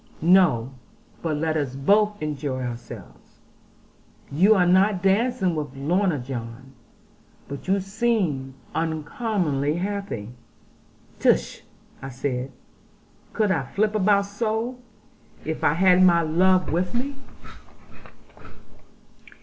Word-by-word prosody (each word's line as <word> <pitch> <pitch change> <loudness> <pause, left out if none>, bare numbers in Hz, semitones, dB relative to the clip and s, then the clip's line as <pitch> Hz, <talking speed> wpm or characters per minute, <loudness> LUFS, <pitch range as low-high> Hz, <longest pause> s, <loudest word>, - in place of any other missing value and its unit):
No, 135 -10 +3 0.5
but 155 -3 -1
let 160 +1 -1
us 140 -4 -2
both 205 +9 +2
enjoy 145 -3 -3
ourselves. 120 -1 -9 0.9
You 190 +10 +5
are 180 -3 +3
not 190 +1 +3
dancing 195 -1 +2
with 145 -4 -4
Lorna, 170 +5 +1
John. 125 0 -7 0.7
But 140 +5 -8
you 195 +1 +2
seem 195 - -1 0.2
uncommonly 160 - -1
happy.' 195 - -4 0.9
'Tush,' - - +1 0.4
I 135 - -6
said; 130 0 -3 0.8
'could 215 -3 +1
I 165 -6 +1
flip 205 +10 -1
about 200 -1 +3
so, 225 +4 -3 0.7
if 160 +1 -4
I 145 - +4
had 180 +1 +5
my 170 -2 +5
love 180 +3 +2
with 180 +5 -1
me?' 270 +4 -2
175 Hz, 105 wpm, -24 LUFS, 140-200 Hz, 0.9 s, You